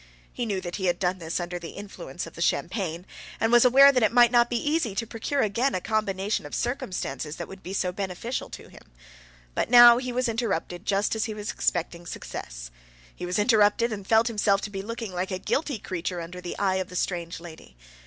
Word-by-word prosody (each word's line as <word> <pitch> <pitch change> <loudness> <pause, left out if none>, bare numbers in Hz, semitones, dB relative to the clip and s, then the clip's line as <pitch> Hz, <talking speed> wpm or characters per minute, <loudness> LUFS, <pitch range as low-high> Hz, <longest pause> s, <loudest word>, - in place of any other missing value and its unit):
He 240 -2 -3
knew 200 -3 -1
that 175 -1 -5
he 190 - -3
had 175 -1 +1
done 185 0 -1
this 165 +1 -3
under 175 0 -4
the 165 -1 -9
influence 200 0 -7
of - - -11
the - - -9
champagne, 180 -4 -1 0.3
and 225 - +1
was 240 +1 +6
aware 275 +3 +8
that 255 -2 +1
it 220 - +3
might 240 -1 +6
not 240 -1 +4
be 240 - 0
easy 295 -6 0
to 230 - -1
procure 230 +5 -2
again 230 +6 +1
a - - 0
combination 205 0 -1
of - - -6
circumstances 185 - -3
that 170 - -6
would 190 0 -11
be 185 - -8
so 185 -2 0
beneficial 195 +6 -4
to - - -10
him. - - -15 0.7
But - - -1
now 240 0 +9
he 255 -1 -4
was 250 +1 0
interrupted 210 -7 -2
just 200 +2 +1
as 220 - 0
he 220 -3 -5
was 210 0 -4
expecting 175 0 -2
success. - - -7 0.4
He 180 - -6
was 180 - -1
interrupted, 220 +1 +3
and 200 -2 -7
felt 225 0 +4
himself 210 -3 +2
to 205 - -5
be 195 -1 -4
looking 225 -1 -6
like 180 +1 -2
a 185 - -2
guilty 280 - -1
creature 180 -2 -4
under 175 +2 -7
the 175 - -6
eye 190 -2 +1
of 185 -1 -3
the 180 - -10
strange 175 -2 -2
lady. 160 - -13
200 Hz, 225 wpm, -26 LUFS, 180-235 Hz, 0.7 s, now